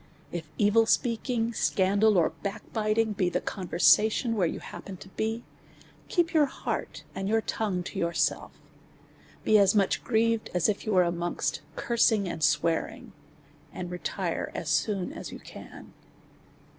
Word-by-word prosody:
If 165 -3 -6
evil 220 +2 +4
speaking, 235 0 0
scandal, 200 +1 +2
or 170 - +3
backbiting, 215 +2 -1
be 185 -3 +1
the - - 0
con 190 -3 -5
versation 220 +7 +4
where 190 -6 +2
you - - -4
happen 190 -2 -9
to 190 - -13
be, 225 +4 -3 0.6
keep 345 -2 +1
your 305 -3 +4
heart - - -5
and 195 +1 -3
your 225 +1 +2
tongue 200 -5 -2
to - - -6
yourself; 170 0 0 0.9
be 215 -1 +5
as 200 +1 +4
much 200 -2 +2
grieved 230 -1 +1
as 180 - +3
if 210 +1 -2
you 215 - +1
was 180 -1 +5
amongst 170 0 -2
cursing 225 -4 +2
and 165 -2 -4
swearing, 165 +2 0 0.6
and 180 -1 -6
retire 180 0 -3
as 155 - -4
.soon 185 - 0
as - - -7
you - - -7
can. - - -12
205 Hz, 150 wpm, -28 LUFS, 180-225 Hz, 0.9 s, be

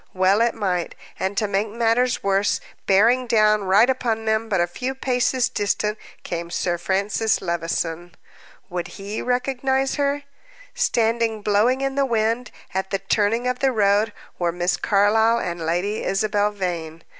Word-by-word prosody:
Well 190 +3 +3
it 235 0 +2
might. 185 -5 -2 0.2
And, 190 +1 -2
to 210 - +1
make 200 +2 -1
matters 235 +3 +1
worse, 195 +1 +1 0.3
bearing 230 +6 +4
down 215 -2 +3
right 200 +5 +5
upon 235 -4 -1
them, 220 +1 0
but 195 - +1
a 175 - +3
few 250 +10 -4
paces 255 -1 +1
distant, 210 +1 -1 0.3
came 170 0 -4
Sir 175 0 -1
Francis 200 +4 0
Levison. 170 0 -3 0.5
Would 175 -1 -4
he 200 +2 -5
recognize 265 +2 0
her? 285 +1 0 0.5
Standing 230 - 0
blowing 220 +6 +2
in 270 0 -1
the 275 0 +1
wind 230 +1 0 0.2
at 190 0 -2
the 195 - 0
turning 210 +5 0
of 250 0 -1
the 270 -1 +2
road 210 -1 +2 0.3
were 175 -1 +1
Miss 175 +1 0
Carlyle 220 +3 +3
and 170 -6 -3
Lady 180 +6 -1
Isabel 205 +1 +1
Vane. 170 -5 -4
210 Hz, 155 wpm, -22 LUFS, 190-235 Hz, 0.5 s, right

